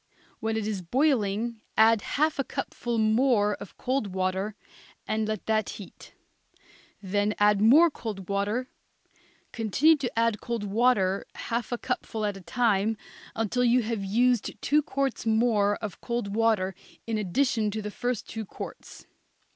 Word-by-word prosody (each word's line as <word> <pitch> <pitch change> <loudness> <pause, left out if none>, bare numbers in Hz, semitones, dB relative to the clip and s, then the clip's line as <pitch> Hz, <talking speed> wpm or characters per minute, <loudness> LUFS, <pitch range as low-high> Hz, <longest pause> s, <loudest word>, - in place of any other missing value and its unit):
When 220 0 -1
it 220 - -2
is 210 -3 -2
boiling 230 - 0 0.2
add 220 0 +5
half 310 +1 0
a - - +2
cupful 240 -2 -4
more 220 -1 +3
of - - -11
cold 250 -7 -2
water 190 +2 -1 0.5
and 215 0 0
let 215 -2 -3
that 215 -1 +1
heat; 200 - -13 0.9
then 205 +2 0
add 205 -1 +4
more 300 +10 +7
cold 205 -8 -6
water; 205 +5 -1 0.8
continue 245 +8 +3
to 270 -4 -3
add 230 -2 +1
cold 235 -3 -3
water, 205 -2 +2
half 235 0 -3
a 240 - 0
cupful 220 -2 -3
at 205 -1 -1
a 195 - -10
time, 220 0 +1 0.4
until 225 +3 0
you 245 0 +4
have 220 -2 -2
used 240 +4 +1
two 300 +1 +3
quarts 275 -4 -2
more 220 -2 +3
of 210 -5 -7
cold 235 -4 -3
water 215 -4 +2 0.3
in 225 -2 -1
addition 220 +2 +1
to 215 +1 -3
the 210 - -4
first 245 +1 -3
two 220 0 -5
quarts. 200 - -9
220 Hz, 150 wpm, -27 LUFS, 205-240 Hz, 0.9 s, more